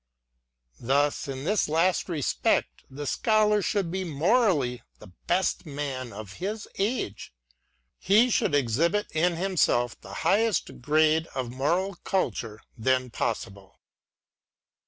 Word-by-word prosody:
Thus, 140 +5 +1
in 135 -1 -5
this 205 0 +1
last 170 +4 +1
respect, 155 -6 0
the 145 +2 -7
Scholar 210 - +2
should 195 -3 -1
be 190 +1 -2
morally 160 - +1 0.2
the 105 - -14 0.2
best 180 -1 0
man 140 -4 -4
of 100 -2 -9
his 205 +4 -4
age; 195 - -2 0.3
— - - -45 0.3
he 220 +6 +4
should 145 - +2
exhibit 150 - +1
in 170 +2 +1
himself 165 -10 +1
the - - -11
highest 215 - +1
grade 155 +3 +3
of 125 -2 -3
moral 170 +10 0
culture 115 - -2
then 130 +1 0
possible. 100 -4 -4
155 Hz, 120 wpm, -27 LUFS, 130-190 Hz, 0.3 s, he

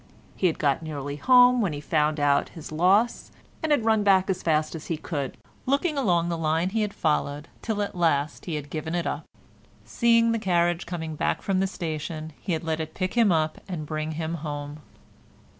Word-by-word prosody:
He 185 - +2
had 165 - -1
got 140 0 +1
nearly 145 -3 -5
home 250 - +6
when 190 -7 0
he 145 - -4
found 150 0 +1
out 145 -1 +2
his 160 -3 -10
loss, 190 +9 +2 0.3
and 315 - -1
had 270 -7 +3
run 220 -1 +3
back 195 -2 +4
as 185 - -3
fast 155 -2 +1
as 160 -2 -7
he 165 - -1
could, 145 -4 -4 0.3
looking 285 +4 +1
along 175 -11 +2
the 170 -1 -2
line 160 +3 +1
he 225 +1 0
had 210 -1 -1
followed, 150 -3 -1
till 210 -3 -1
at 200 - -5
last 155 -5 0
he 170 - -3
had 145 -1 -6
given 160 +1 -3
it 175 - -1
up; - - -3 0.6
seeing 230 -1 +3
the 230 - 0
carriage 175 -3 +1
coming 160 -3 -4
back - - -1
from 195 -2 +1
the 195 - +2
station, 160 -3 -5
he 180 - -2
had 160 - -2
let 160 -1 -1
it 160 0 -5
pick 185 0 -2
him 230 -5 +4
up 155 -2 0
and 170 -5 -4
bring 155 +1 -3
him 160 +1 -3
home. 145 -1 -5
165 Hz, 210 wpm, -26 LUFS, 155-195 Hz, 0.6 s, home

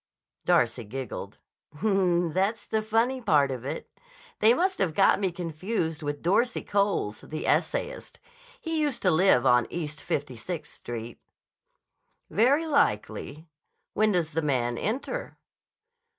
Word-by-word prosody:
Darcy - - +2
giggled. 125 +3 -6 0.4
"That's 190 +1 +1
the 220 - 0
funny 230 +4 +1
part 145 - +3
of 125 -2 -5
it. 135 - -5 0.5
They 215 +2 +6
must 375 +3 0
have 165 -5 0
got 195 - +5
me 190 -3 0
confused 170 0 -3
with 145 -1 -4
Dorsey 230 +8 +1
Coles, 200 - 0
the 155 - -6
essayist. - - -1 0.4
He 325 -2 -2
used 290 -5 -1
to 185 - +4
live 160 -6 +4
on 125 -1 +4
East 155 -3 -5
Fifty 140 -3 -3
Sixth 155 +5 -6
Street." 120 0 -7 1.1
"Very 275 +9 +3
likely. 280 - 0 0.5
When 215 +1 +3
does 170 -3 0
the 165 +2 -1
Man 125 -5 0
enter?" 265 - -3
180 Hz, 130 wpm, -27 LUFS, 145-225 Hz, 1.1 s, They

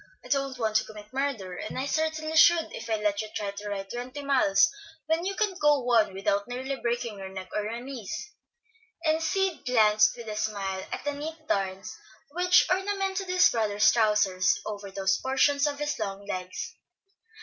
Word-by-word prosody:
I - - -11
don't 275 -2 0
want 220 -2 +1
to 215 - +1
commit 210 0 -12
murder, 260 -9 -2
and 215 - -6
I 260 - -1
certainly 315 +1 -1
should 330 +1 +6
if 230 - -7
I 220 - +2
let 210 -1 0
you 215 - -6
try 205 -1 -2
to 205 +1 -7
ride 195 -1 -5
twenty 250 +4 -6
miles 255 -8 +4 0.4
when 320 +3 0
you 395 +1 -2
can't 395 -4 -1
go 295 -3 +4
one 230 -5 +3
without 200 +1 0
nearly 260 +3 -3
breaking 235 -4 -3
your 190 0 -6
neck, 190 -1 -8
or 210 - +1
your 230 +3 -4
knees," 260 - -6 0.7
and 315 +1 +2
Sid 385 +1 0
glanced 215 -3 +4
with 235 -1 -9
a 215 - -4
smile 195 -3 -3
at - - -4
the 290 - 0
neat 310 +2 -7
darns 190 -1 -2 0.4
which 360 +3 +4
ornamented 390 0 -1
his 365 0 +5
brother's 215 -2 +3
trousers 210 -5 +2
over 205 -1 -6
those 195 0 0
portions 280 +2 +2
of 285 -1 -3
his 295 0 -2
long 200 -1 -4
legs. 185 -2 -5
235 Hz, 185 wpm, -27 LUFS, 205-295 Hz, 0.7 s, should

